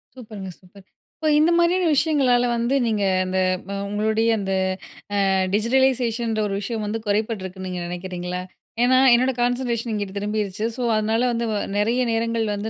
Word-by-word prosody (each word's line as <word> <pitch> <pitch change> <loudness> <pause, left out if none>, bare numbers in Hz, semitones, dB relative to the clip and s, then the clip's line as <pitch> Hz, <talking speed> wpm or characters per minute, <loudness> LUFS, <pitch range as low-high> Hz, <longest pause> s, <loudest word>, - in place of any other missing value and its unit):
சூப்பருங்க, 215 -6 -8
சூப்பர். 190 +1 -18 0.3
இப்போ 310 - 0
இந்த 315 +3 +4
மாதிரியான 350 +2 +3
விஷயங்களால 270 -5 +3
வந்து 235 +4 0
நீங்க 215 -2 0 0.2
அந்த 185 0 -2 0.5
உங்களுடைய 220 +2 +1
அந்த 195 -1 -2 0.8
ஆ - - +2 0.2
டிஜிடலைசேஷன்ற 235 -1 +1
ஒரு 195 - -3
விஷயம் 220 +1 -3
வந்து 215 +2 -2
குறைபட்டிருக்குன்னு 200 -3 -2
நீங்க 180 -1 -4
நினைக்கிறீங்களா? 180 0 -5 0.4
ஏனா, 255 +1 +4 0.2
"என்னோட 255 +2 +3
கான்சென்ட்ரேஷன் 240 -1 -1
இங்கிட்டு 205 -2 -3
திரும்பிருச்சு. 210 0 -2
ஸோ, 255 - -5
அதனால 220 +2 +1
வந்து 235 0 -1
வ - - -1 0.2
நிறைய 225 +4 +1
நேரங்கள் 230 0 0
வந்து 205 +2 -4
220 Hz, 145 wpm, -22 LUFS, 200-245 Hz, 0.8 s, இந்த